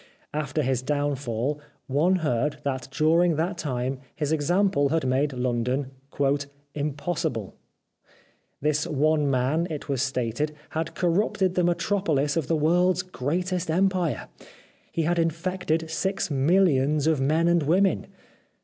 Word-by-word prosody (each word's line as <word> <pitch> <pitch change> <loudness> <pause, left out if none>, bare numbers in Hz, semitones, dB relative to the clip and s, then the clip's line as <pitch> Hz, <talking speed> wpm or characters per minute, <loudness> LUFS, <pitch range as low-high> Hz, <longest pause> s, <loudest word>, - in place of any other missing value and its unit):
After 150 0 -1
his 130 -1 0
downfall 145 -1 -1 0.3
one 155 +8 +2
heard 145 +3 0
that 130 -2 -2
during 160 +4 +3
that 170 +3 -1
time 130 -3 -2 0.2
his 150 -1 -2
example 160 -1 +2
had 160 -1 0
made 135 +3 +1
London 125 +1 -1 0.4
" 145 0 0 0.3
impossible." 145 - -2 1.1
This 150 +1 0
one 150 0 +2
man, 135 +6 +1
it 150 -3 -5
was 135 -3 0
stated, 130 +2 -1 0.2
had 160 +1 -3
corrupted 185 +1 +1
the 180 - +1
metropolis 170 -4 +1
of 160 -5 -1
the 165 - +2
world's 180 +4 +3
greatest 180 +3 -2
empire. 180 -1 +1 0.6
He 165 - -1
had 170 +2 +1
infected 165 -1 -1
six 190 +1 -1
millions 145 -1 +3
of 160 -4 +2
men 155 +5 +2
and 170 -1 +4
women. 185 +6 +2
150 Hz, 130 wpm, -26 LUFS, 135-170 Hz, 1.1 s, and